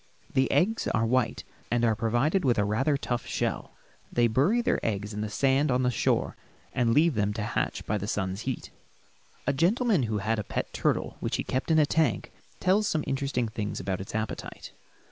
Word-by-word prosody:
The 130 0 +2
eggs 220 +5 +2
are 110 - +1
white 125 +1 +1 0.3
and 120 0 +2
are 115 - +3
provided 120 - +1
with 125 -5 +2
a 105 - +2
rather 135 +8 +1
tough 120 -2 -3
shell. - - -2 0.4
They 120 - +3
bury 140 - +3
their - - 0
eggs 105 -1 -2
in 105 +1 -3
sand 135 +6 +2
on 125 0 +2
the 125 - +2
shore - - 0 0.4
and 120 -3 +2
leave 155 +6 +4
them 105 -2 0
to 105 0 -3
hatch 105 0 -2
by 105 0 -1
the 100 - -4
sun's 95 -1 -2
heat. 130 - -5 0.7
A 140 - +2
gentleman 200 - +2
who 110 - 0
had 110 +2 0
a - - -2
pet - - -4
turtle - - 0
which - - -2
he - - -1
kept 130 +5 -2
in 160 - +4
a 155 - +6
tank 160 +1 0 0.3
tells 200 +3 +3
some 155 -5 0
interesting 135 -3 -1
things 110 -1 -4
about 95 -1 -3
its 100 - -7
appetite. 110 -1 -5
120 Hz, 200 wpm, -28 LUFS, 110-145 Hz, 0.7 s, a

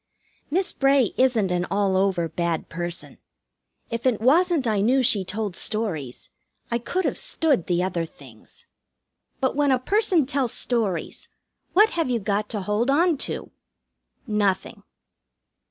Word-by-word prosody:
Miss 365 +5 0
Bray 275 -4 +3
isn't 235 -7 +2
an 180 0 0
all 200 -2 +1
over 185 -3 +1
bad 170 -1 -2
person. 175 0 -5 0.7
If 230 +2 -1
it 240 -5 +1
wasn't 315 +5 +3
I 215 -3 +1
knew 255 +5 +3
she 215 -5 +3
told 205 0 -4
stories, 175 - -3 0.4
I 235 - +1
could 360 +10 -2
have - - -1
stood 285 - +1
the 175 0 +1
other 170 -3 -2
things. 125 -8 -16 0.7
But 260 0 0
when 290 0 +2
a 260 - +4
person 370 - +2
tells 270 -3 0
stories, 210 -9 -2 0.4
what 425 +3 +6
have 330 -5 -1
you 240 -2 +1
got 205 0 -1
to 210 - -3
hold 210 +6 0
on 330 +4 +3
to? - - -6 0.7
Nothing. 205 -5 -1
225 Hz, 145 wpm, -24 LUFS, 190-270 Hz, 0.7 s, what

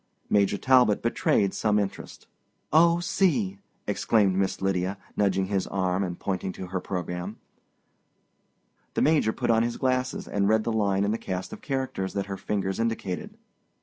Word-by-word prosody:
Major 100 0 +3
Talbot 125 -5 +4
betrayed 105 -4 +2
some 105 -1 +1
interest. 100 -2 -4 0.5
"Oh, 170 +2 +5
see!" 125 - +1 0.3
exclaimed 100 -5 +2
Miss 95 0 0
Lydia, 95 0 -1 0.2
nudging 95 -2 +2
his 95 -1 -1
arm, 95 0 0
and 90 -2 -4
pointing 95 -1 -2
to 95 - -7
her 95 0 -2
program. 90 +2 -4 1.6
The - - +2
Major 150 -8 +3
put 115 - 0
on 115 0 +4
his 120 0 -1
glasses 130 0 -1
and 100 0 +1
read 110 0 +3
the 115 - -1
line 100 -3 +1
in 100 - +1
the 115 - -1
cast 95 0 -4
of - - -9
characters 130 -9 -3
that 100 -1 -2
her 100 -1 -5
fingers 95 -1 -2
indicated. 115 -5 -3
100 Hz, 160 wpm, -26 LUFS, 95-115 Hz, 1.6 s, Oh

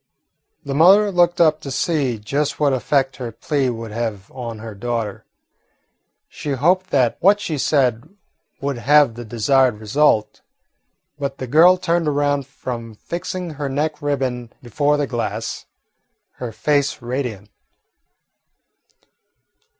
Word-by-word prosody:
The 140 - -3
mother 195 +8 +6
looked 175 -1 +2
up 155 -2 +4
to 140 - -7
see 135 -2 0
just 140 +8 -2
what 145 -2 +3
effect 135 0 0
her 120 -3 -5
plea 135 +3 -1
would 115 -2 -6
have 110 -3 -4
on 115 -3 -6
her 110 0 -8
daughter. 115 -1 -4 1.0
She 145 - -5
hoped 180 +8 +2
that 125 -4 +2
what 200 +3 +4
she 160 -7 -3
said 125 -6 +1 0.5
would 140 -3 -3
have 145 0 +4
the 120 +1 -8
desired 120 +1 +2
result. 110 0 +1 0.8
But 140 -1 -3
the 130 - -5
girl 165 +8 +6
turned 170 -2 0
around 145 -2 0
from 120 -4 -7
fixing 175 - -5
her 145 -2 -4
neck 150 +3 -2
ribbon 130 -5 -2
before 145 +5 +1
the 145 - 0
glass, 120 -3 -4 0.7
her 125 -2 -5
face 145 +4 0
radiant. 120 -5 -4
135 Hz, 130 wpm, -20 LUFS, 120-150 Hz, 1.0 s, mother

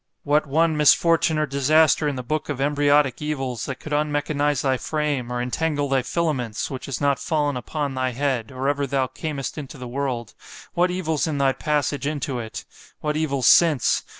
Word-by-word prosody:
What 145 +1 +2
one 160 +3 +2
misfortune 160 +2 +4
or 155 - +2
disaster 150 +2 +3
in 145 - -1
the 125 - -5
book 155 +6 -3
of 140 -3 -3
embryotic 145 -1 +2
evils, 135 -6 -3
that 130 -1 -5
could 155 - -6
unmechanize 145 -1 0
thy 135 -2 +2
frame, 145 -4 -2
or 125 - -2
entangle 145 +4 -1
thy 135 -1 +2
filaments! 130 -8 -2
which 130 - -6
has 135 - -3
not 140 -1 +1
fallen 150 -3 0
upon 140 +3 -3
thy 130 0 0
head, 130 -3 -1
or 130 +1 -3
ever 140 0 0
thou 135 0 +1
camest 140 +2 -5
into 145 0 -8
the 125 -1 -7
world——what 130 - -3
evils 165 -4 -1
in 155 -2 -2
thy 135 -1 +3
passage 145 -2 -1
into 140 -4 -2
it!——what 135 +6 -7
evils 140 -5 -1
since! 160 -7 +5
145 Hz, 180 wpm, -23 LUFS, 130-150 Hz, -, since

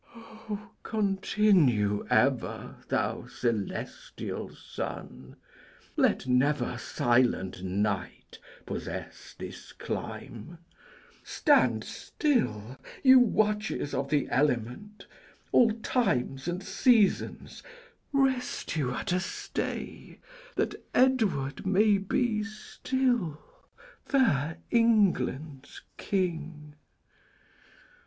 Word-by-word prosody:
Continue 190 - +2
ever, - - +1
thou - - -1
celestial 120 -5 -4
sun; 65 0 -7 0.6
Let - - +2
never 125 -1 +1
silent 120 -7 +1
night 95 0 -3 0.3
possess - - -7
this - - -9
clime; 135 +10 -6 0.7
Stand - - +3
still, 125 - -1 0.3
you 260 -1 +9
watches 210 - +1
of 140 - -2
the 145 -1 +1
element; 135 - -1 0.5
All 235 - +6
times 195 - -1
and 175 +2 -3
seasons, 225 -1 +2 0.5
rest 265 -7 0
you 140 -6 0
at 115 - -3
a 180 - +2
stay, - - -5 0.4
That - - -2
Edward 215 - +2
may 200 +2 +3
be 215 +2 0
still 220 - -1 0.6
fair 160 - +1
England's 180 - +1 0.2
king! 160 -5 -3
170 Hz, 75 wpm, -29 LUFS, -, 0.7 s, you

